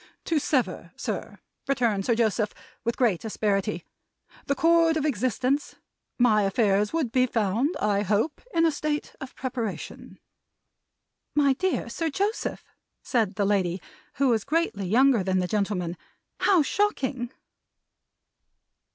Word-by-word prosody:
"To 325 -2 +1
sever, 275 -3 -1
sir," - - -5 0.3
returned 230 -7 +1
Sir 235 - +3
Joseph, 220 -2 0 0.3
with 235 0 -1
great 225 -9 +2
asperity, 205 -3 -1 0.6
"the 280 - +1
cord 330 0 +4
of 305 - -1
existence 255 +2 0 0.4
my 225 -4 +4
affairs 200 0 +2
would 315 -8 -1
be 255 0 +3
found, 230 - 0
I 205 -1 +1
hope, 210 - 0
in 330 -4 +3
a 325 - +4
state 295 0 -3
of 265 -1 -8
preparation." 245 -5 -5 1.2
"My 285 -2 +4
dear 365 -1 -1
Sir 320 +8 -2
Joseph!" 400 +8 -2 0.4
said 220 -6 0
the 200 - +1
lady, 190 -3 +1 0.4
who 275 0 +2
was 225 -3 +2
greatly 280 - -1
younger 250 +3 +4
than 185 0 +1
the 180 -1 +1
gentleman. 195 -4 -1 0.4
"How 365 -6 +4
shocking!" 270 - -1
240 Hz, 130 wpm, -26 LUFS, 205-290 Hz, 1.2 s, cord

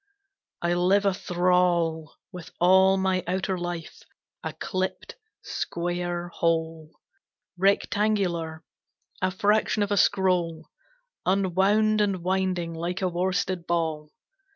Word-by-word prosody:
I 170 0 +2
live 185 +3 +2
a 195 - +3
thrall 175 -4 +1 0.2
With 180 -2 -9
all 190 +2 +5
my 190 -1 0
outer 185 +1 -1
life 175 -2 -6 0.4
a - - -4
clipped, 185 -1 -4 0.3
square 175 0 -3
hole, 165 -2 -1 0.7
Rectangular; 190 -4 0 0.6
a 185 - +2
fraction 205 +2 +1
of 205 - -3
a 205 - +2
scroll 175 -5 +1 0.6
Unwound 200 +3 +2
and 195 -4 0
winding 185 -2 -1
like 175 +3 -3
a - - +3
worsted 180 0 -1
ball. 160 -3 -1
180 Hz, 105 wpm, -26 LUFS, 170-190 Hz, 0.7 s, all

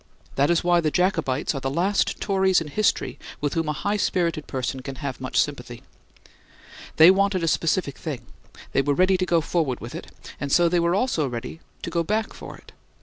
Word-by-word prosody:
That 140 +1 +2
is 170 0 +2
why 175 0 +3
the 155 - +1
Jacobites 160 -6 0
are 135 - -3
the 135 - -1
last 185 +8 0
Tories 190 -2 +2
in 160 -2 -6
history 215 +7 0 0.2
with 145 -1 -1
whom 165 -2 -1
a - - 0
high 205 +8 -1
spirited 170 -6 0
person 130 0 -3
can 135 +1 -7
have 135 -3 -5
much 130 - 0
sympathy. 125 -5 -2 1.1
They 160 +3 +9
wanted 195 -2 +1
a - - +1
specific 160 -2 0
thing; 150 -6 -5 0.5
they - - +2
were 145 +1 0
ready 185 +3 +4
to 185 0 -1
go 170 -1 +3
forward 155 -6 -1
for 115 - -8
it, - - -7 0.3
and 140 - -4
so 175 +3 +5
they 175 +1 +2
were 170 +1 +2
also 195 - 0
ready 120 +6 -6 0.2
to 170 - -4
go 170 0 +1
back 215 +6 -1
for - - -10
it. - - -17
165 Hz, 205 wpm, -24 LUFS, 140-185 Hz, 1.1 s, They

